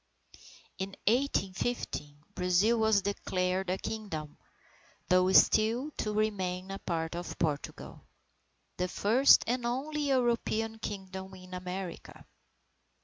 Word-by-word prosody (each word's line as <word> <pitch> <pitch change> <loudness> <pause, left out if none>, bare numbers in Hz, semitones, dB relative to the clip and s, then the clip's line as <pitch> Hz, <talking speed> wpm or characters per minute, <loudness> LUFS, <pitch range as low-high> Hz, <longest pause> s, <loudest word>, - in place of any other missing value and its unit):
In 190 0 -4
1815, 195 - -1
Brazil 185 +6 +2
was 220 -3 +3
declared 185 -2 -1
a 185 - 0
Kingdom, 165 -11 -5 0.7
though 185 +1 +4
still 230 +9 +4
to 210 - -1
remain 195 -3 -1
a 195 - -5
part 165 -1 -2
of 175 +1 -6
Portugal. 150 -3 -3 0.8
The 180 - 0
first 230 +9 +5
and 245 +1 -1
only 285 +5 -2
European 235 -4 0
Kingdom 190 -2 -6
in 185 0 -12
America! 180 0 -6
195 Hz, 105 wpm, -31 LUFS, 180-225 Hz, 0.8 s, first